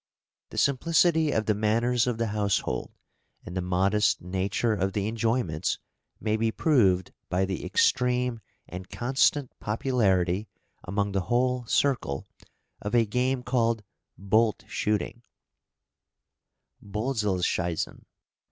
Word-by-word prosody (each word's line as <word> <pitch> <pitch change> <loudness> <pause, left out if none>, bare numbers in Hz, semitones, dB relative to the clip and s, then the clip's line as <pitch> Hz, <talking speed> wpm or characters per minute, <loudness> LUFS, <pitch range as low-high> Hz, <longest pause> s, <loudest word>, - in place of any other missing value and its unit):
The - - -10
simplicity 160 +3 +3
of 110 -6 0
the 105 - +2
manners 115 +4 +1
of 120 -2 0
the 115 -1 -1
household, 100 -11 -1 0.6
and 90 - -7
the 90 - 0
modest 95 +4 +2
nature 95 +5 -1
of 95 -2 -1
the 100 0 -1
enjoyments, 110 -8 0 0.4
may 110 0 0
be 115 0 +1
proved 100 - +2 0.2
by 95 +1 +1
the 95 -3 -4
extreme 125 -1 +1 0.3
and 90 +1 -8
constant 135 +2 +1
popularity 105 -5 +1 0.4
among 100 +2 -1
the 95 0 0
whole 125 0 +1
circle 115 - 0 0.6
of 105 +4 -2
a 115 -1 +5
game 125 +4 0
called 115 -3 +1 0.3
"bolt 110 +4 +2
shooting" 105 +2 -2 1.6
(bölzelschiessen). 100 -6 -1
110 Hz, 115 wpm, -27 LUFS, 95-125 Hz, 1.6 s, a